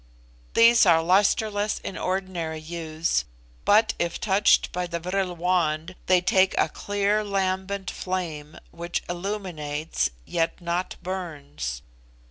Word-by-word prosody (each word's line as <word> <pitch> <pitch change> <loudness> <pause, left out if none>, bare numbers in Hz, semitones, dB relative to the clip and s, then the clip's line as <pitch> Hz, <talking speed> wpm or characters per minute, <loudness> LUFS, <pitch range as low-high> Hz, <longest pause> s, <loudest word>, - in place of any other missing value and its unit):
These 230 -2 +7
are 165 -2 +5
lustreless 205 +3 +2
in 195 - -5
ordinary 185 -4 -2
use, 160 0 -2 0.4
but 220 +2 +5
if 170 -1 -1
touched 200 0 +3
by 180 0 -2
the 170 0 -3
vril 180 +1 -2
wand 170 -1 0
they 185 -1 +5
take 185 +1 +3
a - - +3
clear 205 +1 0
lambent 195 -1 -1
flame, 160 -5 -4
which 170 +1 -4
illuminates, 165 - -2 0.2
yet 165 - -1
not 175 +1 -2
burns. 145 - -5
180 Hz, 115 wpm, -25 LUFS, 165-195 Hz, 0.4 s, These